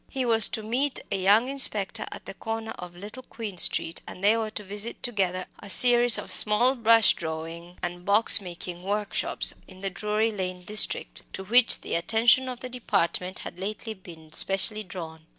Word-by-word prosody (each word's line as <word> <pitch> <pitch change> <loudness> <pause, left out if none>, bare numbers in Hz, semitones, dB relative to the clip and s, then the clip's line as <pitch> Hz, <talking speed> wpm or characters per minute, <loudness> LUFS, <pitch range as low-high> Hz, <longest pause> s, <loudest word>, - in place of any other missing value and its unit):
He 265 -2 -4
was 225 -2 +6
to 220 - -6
meet 255 +6 -2
a - - -1
young 200 +5 +2
inspector 260 -8 +1
at - - -11
the - - -9
corner 225 +2 -7
of 180 -4 -11
Little 210 +8 -11
Queen 215 -7 -9
Street, 165 - +5
and 185 - -12
they 210 +2 +3
were 225 -1 -4
to 215 -1 -7
visit 205 +4 -3
together 185 -6 -3
a 200 - -12
series 245 +2 +5
of - - -8
small 230 +5 +1
brush 230 -3 +2
drawing 165 +1 -9
and 175 0 -6
box 205 +2 +6
making 175 -1 -10
workshops 205 +2 -4
in 185 -1 -16
the 195 -1 -5
Drury 210 +3 -2
Lane 185 -3 -7
district, 210 +3 +3
to 190 - -7
which 235 +4 +2
the - - -8
attention 230 +8 +1
of 250 -1 -9
the 255 - -7
Department 190 -6 -3
had 180 - -10
lately 215 +3 -7
been 165 -5 -16
specially 210 +3 +1
drawn. 160 -4 -11
205 Hz, 185 wpm, -24 LUFS, 180-225 Hz, -, was